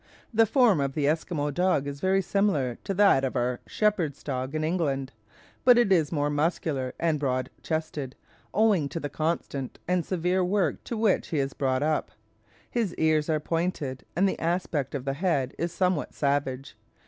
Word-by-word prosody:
The 225 0 +5
form 230 - +4
of 135 -1 -1
the 145 -1 0
Esquimaux 155 -1 0
dog 180 -2 +1
is 140 0 -5
very 190 +3 +2
similar 170 - 0
to 195 - -1
that 195 -9 +5
of 135 - -1
our 120 0 0
shepherds' 185 -10 0
dog 130 0 -3
in 155 - -1
England, 145 -5 -1 0.5
but 250 -1 +7
it 240 -5 +3
is 160 -6 +3
more 145 -2 0
muscular 145 -3 -1
and 160 -3 +1
broad 130 -2 -1
chested, 155 -4 -3 0.4
owing 200 -9 +3
to 165 - -4
the 145 - -4
constant 155 -4 -2
and 180 -1 +1
severe 180 +2 0
work 185 -3 0
to 235 - -4
which 215 -3 +2
he 160 - -2
is 135 -1 -1
brought 130 0 0
up. 155 0 0 0.6
His 225 -7 -1
ears 155 -1 +2
are 155 -1 +2
pointed, 155 -5 -2
and 195 +3 +3
the - - -2
aspect 165 -5 -1
of 135 -2 -4
the 135 - 0
head 140 -5 0
is 170 +1 -1
somewhat 180 -3 0
savage. 140 -3 -1
155 Hz, 180 wpm, -27 LUFS, 140-185 Hz, 0.6 s, but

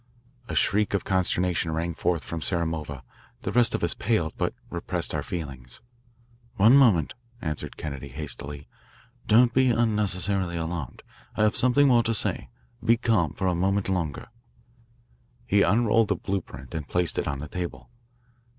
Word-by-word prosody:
A - - -4
shriek 105 0 +2
of 100 - -1
consternation 90 -2 0
rang 85 +2 -2
forth 85 -1 -1
from 80 +5 -5
Samarova. 80 -6 -2 0.4
The - - -2
rest 120 -1 +3
of - - -3
us 85 - +1
paled, 95 -8 0
but - - -2 0.2
repressed - - -3
our - - -1
feelings. 65 -8 -6 0.8
One 110 +4 +6
moment," 110 - +4 0.3
added 75 -9 -5
Kennedy 70 -2 -6
hastily. 70 +1 -7 0.6
"Don't 120 +2 +5
be 130 0 +4
unnecessarily 100 -5 +1
alarmed. 80 -5 -5 0.3
I - - +3
have 105 0 +3
something 135 +3 +4
more 120 -3 +5
to 115 0 0
say. 65 - +1 0.3
Be 115 +1 +4
calm 110 - +1
for 95 - -3
a 90 - +2
moment 95 +3 0
longer." 85 -5 -2 1.2
He 100 +9 +3
unrolled 115 +1 +3
a - - +3
blue 100 -1 -2
print 65 -4 -12
and 80 -3 -4
placed 90 -2 0
it - - -2
on 70 -1 -2
the 75 +2 -6
table. 90 +7 -6
90 Hz, 160 wpm, -26 LUFS, 80-110 Hz, 1.2 s, One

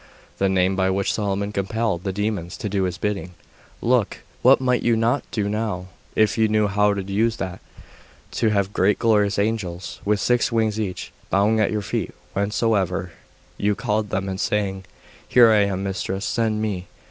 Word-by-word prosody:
The 95 - +2
name 95 0 +2
by 95 0 +1
which 95 +1 0
Solomon 100 -1 -1
compelled 100 -2 -1
the 95 - -1
demons 100 -3 -3
to - - -4
do 100 -2 0
his 90 -2 -3
bidding. 90 -4 -3 0.5
Look! 120 -3 +1 0.2
What - - +6
might 125 -1 +1
you 120 -1 +2
not 115 +4 +1
do 105 -3 -1
now, 105 -4 -2 0.3
if 110 0 +2
you 110 - +4
knew 105 0 +2
how 105 0 +2
to 100 - -3
use 110 +4 0
that! 95 -5 -5 0.7
To 110 - +1
have 100 -1 0
great 100 +2 +3
glorious 105 -3 +2
angels, 100 -4 -2
with 105 0 +1
six 120 +4 +2
wings 110 -2 +1
each, 95 -4 -4 0.2
bowing 105 +3 +3
at 105 - +2
your 105 -1 -1
feet 100 - -3 0.2
whensoever 100 -3 0 0.5
you 105 0 +1
called 105 +1 -1
them, 95 0 -2
and 95 0 -4
saying, 95 -3 -1 0.4
"Here 120 -2 +6
am 100 -2 +3
I, - - -1
mistress; 95 +1 -3
send 110 -2 0
me." 95 -4 -3
105 Hz, 180 wpm, -23 LUFS, 95-110 Hz, 0.7 s, What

